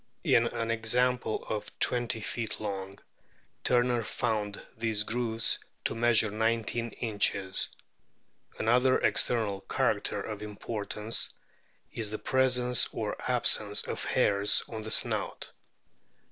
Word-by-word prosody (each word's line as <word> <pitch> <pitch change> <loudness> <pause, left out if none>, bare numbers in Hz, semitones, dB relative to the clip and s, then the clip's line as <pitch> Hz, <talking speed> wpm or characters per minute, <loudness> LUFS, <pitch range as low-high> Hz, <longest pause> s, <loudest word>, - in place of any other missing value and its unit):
In 115 0 +4
an 115 0 -3
example 120 +1 0
of 110 -1 -5
twenty 120 -2 +1
feet 110 0 -4
long 100 -2 -5 0.7
Turner 120 -1 +2
found 110 -3 -2 0.2
these 110 -2 0
grooves 115 0 +1 0.3
to - - 0
measure 115 -2 +3
nineteen 115 +2 -1
inches. 100 -4 0 0.9
Another 125 +3 +3
external 105 -5 +2
character - - 0
of 105 -2 -6
importance 105 +1 0 0.6
is 110 -3 -2
the 110 - -3
presence 125 -1 +3
or - - -3
absence - - +2
of - - -4
hairs 100 0 +3
on 110 -2 -6
the 110 - -5
snout. - - -2
115 Hz, 110 wpm, -29 LUFS, 105-120 Hz, 0.9 s, In